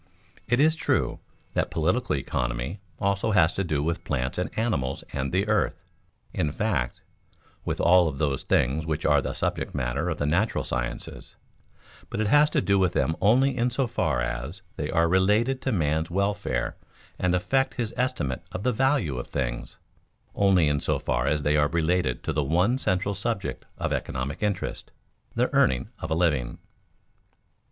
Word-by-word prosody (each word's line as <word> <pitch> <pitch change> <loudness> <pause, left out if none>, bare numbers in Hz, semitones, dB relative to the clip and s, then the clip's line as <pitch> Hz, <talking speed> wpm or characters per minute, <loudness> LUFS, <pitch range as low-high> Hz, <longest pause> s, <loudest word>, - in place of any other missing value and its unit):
_ - - -23
It 120 +1 +2
is 155 +2 +5
true 160 - 0 0.3
that - - 0
political 85 +3 0
economy 60 +5 -2 0.2
also 100 +2 0
has 80 -4 +4
to 95 - -1
do 75 -5 -1
with 85 +2 -2
plants 65 +6 -2
and 90 - -1
animals 75 - -1
and 70 -1 -2
the 95 +4 +1
earth 105 -1 +2 0.6
in 75 - 0
fact, 80 - -1 0.6
with - - -2
all 90 0 +5
of 75 -4 -3
those 70 -2 0
things 70 +6 +1
which 80 0 -3
are 75 -1 +4
the - - -3
subject - - -2
matter 70 +5 -1
of 80 - -2
the 75 - -1
natural 90 +9 +1
sciences; - - -5 0.7
but - - -4
it 110 - +1
has 145 +8 +5
to - - +1
do 100 -1 +2
with 90 -2 +2
them 80 - +1
only 125 +6 +4
in 125 0 +1
so 130 +2 0
far 80 - 0
as 65 +10 -4
they 75 - -3
are 85 0 +3
related 105 +9 +2
to 130 - -1
man's 80 -4 0
welfare 95 -9 -1 0.4
and 90 0 +2
affect 135 +9 +1
his 115 -3 -3
estimate 125 - -1
of 95 - -5
the 125 +1 +2
value 130 - +1
of - - -6
things; - - -4 0.6
only 95 -5 +4
in 75 -1 +1
so - - 0
far 65 0 -1
as 75 0 +1
they 75 +1 +2
are 75 0 +4
related 85 -4 0
to - - -2
the 75 - +1
one 90 - +2
central 95 -3 0
subject 100 +1 -3
of - - -1
economic 70 +4 -3
interest, 105 -2 -2 0.5
the - - +1
earning 65 -1 +3
of 80 - -5
a 80 - +1
living. 75 -8 +1
85 Hz, 180 wpm, -26 LUFS, 70-105 Hz, 0.7 s, is